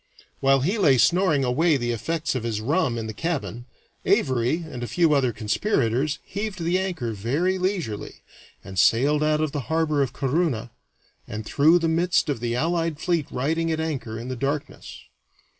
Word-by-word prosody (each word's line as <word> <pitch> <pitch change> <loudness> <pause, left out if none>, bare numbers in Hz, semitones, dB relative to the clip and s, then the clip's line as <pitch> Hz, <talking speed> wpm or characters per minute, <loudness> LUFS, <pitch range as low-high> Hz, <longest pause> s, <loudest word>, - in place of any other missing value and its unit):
While 135 -1 +3
he 190 - 0
lay 145 -9 +5
snoring 170 -1 +3
away 150 +5 +2
the 120 -2 -2
effects 165 +8 -2
of 130 - -2
his 110 -2 -2
rum 135 +1 0
in 115 - -3
the 110 - -5
cabin, 135 -4 -4 0.4
Avary 130 +6 +1
and 125 -6 -8
a 120 - -3
few 165 0 +2
other 135 -4 +2
conspirators 120 - 0
heaved 205 -2 -5
the 175 +3 +1
anchor 175 -12 -3
very 145 - 0
leisurely, 180 - -3 0.4
and 95 -1 -5
sailed 140 +10 +4
out 155 0 +2
of 155 -2 0
the 140 -5 -4
harbor 160 -2 +1
of 135 - 0
Corunna, 135 -5 -1 0.6
and 110 0 -6
through 155 +8 +4
the 165 -1 0
midst 170 0 +1
of 140 - -1
the 120 0 -2
allied 165 +2 0
fleet 170 -4 0
riding 165 +6 -1
at 160 - -1
anchor 130 -9 -3
in 115 +2 -6
the 130 - -3
darkness. 140 - -4
145 Hz, 175 wpm, -24 LUFS, 120-165 Hz, 0.6 s, lay